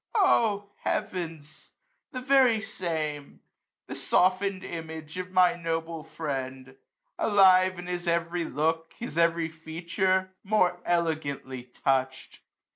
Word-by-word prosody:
O 215 - +3
heavens! 160 -4 -4 0.4
the 255 - -5
very 260 -3 +4
same, 160 -9 -4 0.4
The - - -7
softened 185 +1 +2
image 160 0 -7
of 185 0 -5
my 185 -1 +5
noble 165 -1 -3
friend; 135 -4 -5 0.2
*' - - -49
Alive 185 -3 +5
his 175 0 -5
every 170 0 0
look, 160 +3 -1
his 240 - -6
every 170 -1 +2
feature, 170 +4 -1
More 185 -4 +2
elegantly 150 -7 -1 0.2
touch'd. 130 -1 0
170 Hz, 110 wpm, -28 LUFS, 160-185 Hz, 0.4 s, my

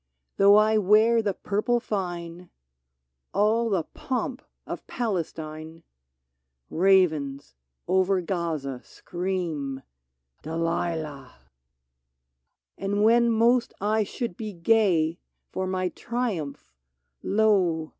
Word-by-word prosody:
Though 200 +1 +7
I 215 +1 +4
wear 215 +4 +4
the 205 -3 -1
purple 225 +4 0
fine 175 -4 -5 0.4
— 65 0 -54
All 225 +3 +2
the 190 -6 +1
pomp 260 - -4 0.2
of - - -7
Palestine 160 -6 -4 0.4
— 65 0 -54
Ravens 160 - +2 0.3
over 190 +1 +2
Gaza 160 -8 -3
scream: 165 -7 -4 0.6
"Delilah!" 160 -4 -3 1.4
And 205 +1 0
when 235 +2 +5
most 235 +2 +2
I 215 +2 +1
should 210 -1 -5
be 215 0 -6
gay 170 -3 +2 0.3
For 185 0 -3
my 185 -1 -1
triumph, 215 - -4 0.3
— 65 0 -53 0.2
lo 180 -8 +2
185 Hz, 100 wpm, -26 LUFS, 160-215 Hz, 1.4 s, Though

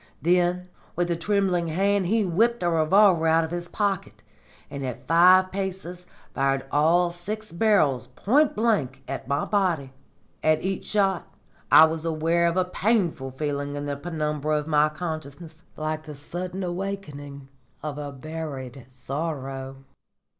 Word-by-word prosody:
Then 180 +1 +1 0.3
with 175 0 0
a - - +1
trembling 180 -1 0
hand 195 +3 +1
he 220 +2 +2
whipped 225 +6 +1
a 175 - +2
revolver 170 +1 +4
out 165 +1 +4
of 160 - -5
his 175 0 -4
pocket, 200 -1 -2 0.4
and 140 - -6
at 125 -2 -5
five 185 +3 +6
paces 185 -2 -5 0.3
fired 135 0 0
all 170 +4 +3
six 210 +5 -6
barrels 170 - +2
point 265 - +2
blank 155 - 0
at 135 -1 -5
my 140 +1 0
body. 175 -10 0 0.5
At 155 0 +2
each 190 0 -3
shot 195 -3 0 0.4
I 160 - +10
was 160 0 -3
aware 165 +1 +1
of 170 +2 0
a 185 - +3
painful 180 - 0
feeling 145 +1 -3
in 145 0 -4
the 145 0 -2
penumbra 150 -1 -2
of 150 - -3
my 150 -1 +3
consciousness, 155 0 -7 0.2
like 155 0 -2
the 155 -1 -10
sudden 180 +6 -5
awakening 160 -7 -5 0.3
of 150 -1 -4
a 145 -1 -5
buried 140 -4 -7
sorrow." 135 0 -5
165 Hz, 145 wpm, -25 LUFS, 145-185 Hz, 0.5 s, I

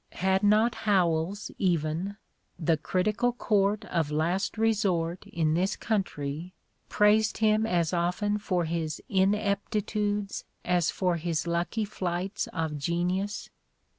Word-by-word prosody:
Had 190 +1 +2
not 215 +3 +4 0.2
Howells 180 +1 +1
even, 175 +2 0 0.4
the 165 -1 +2
"Critical 210 +9 0
Court 210 -3 +1
of 165 -7 -1
Last 165 +5 0
Eesort 195 -6 0
in 160 -2 0
this 185 +5 +1
country," 175 -5 -3 0.3
praised 210 +1 +3
him 215 0 +3
as 170 -3 +1
often 180 +5 0
for 180 -4 0
his 160 -1 -2
ineptitudes 205 0 0 0.2
as 175 -2 +2
for 180 -2 0
his 165 -1 -2
lucky 175 +6 -1
flights 190 0 -3
of 160 -3 -3
genius? 180 +6 -1
185 Hz, 115 wpm, -28 LUFS, 170-210 Hz, 0.4 s, not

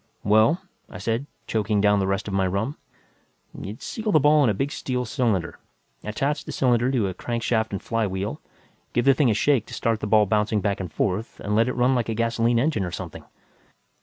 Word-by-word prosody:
"Well," 110 - +4 0.3
I - - -9
said, 115 +8 -2 0.2
choking 105 -1 0
down 105 0 +4
the 95 - 0
rest 95 +2 -1
of 100 - -4
my 95 -1 +2
rum, 100 +10 -2 0.8
"you'd 105 +3 -8
seal 220 -2 -3
the 155 - +5
ball 150 +1 +5
in 125 - +4
a - - +2
big 135 +8 -1
steel 125 -3 -2
cylinder, 110 - -1 0.4
attach 135 +8 -2
the - - -7
cylinder 125 -1 +2
to 120 -7 +1
a 95 - -3
crankshaft 115 +1 -1
and 100 - -3
flywheel, 100 -3 -2 0.5
give 120 - +1
the 135 - +7
thing 135 -1 +2
a 110 - +2
shake 125 +1 +2
to - - -7
start 115 -1 0
the - - -3
ball 105 0 +5
bouncing 105 +1 +1
back 100 0 -1
and 90 -4 -5
forth, 100 +7 -2
and 105 +1 -1
let 115 +2 +3
it 125 - -1
run 125 +1 +3
like 120 -3 0
a 110 - -1
gasoline 115 +1 +1
engine 125 -4 +1
or 90 - -2
something. - - -7
110 Hz, 215 wpm, -24 LUFS, 100-125 Hz, 0.8 s, the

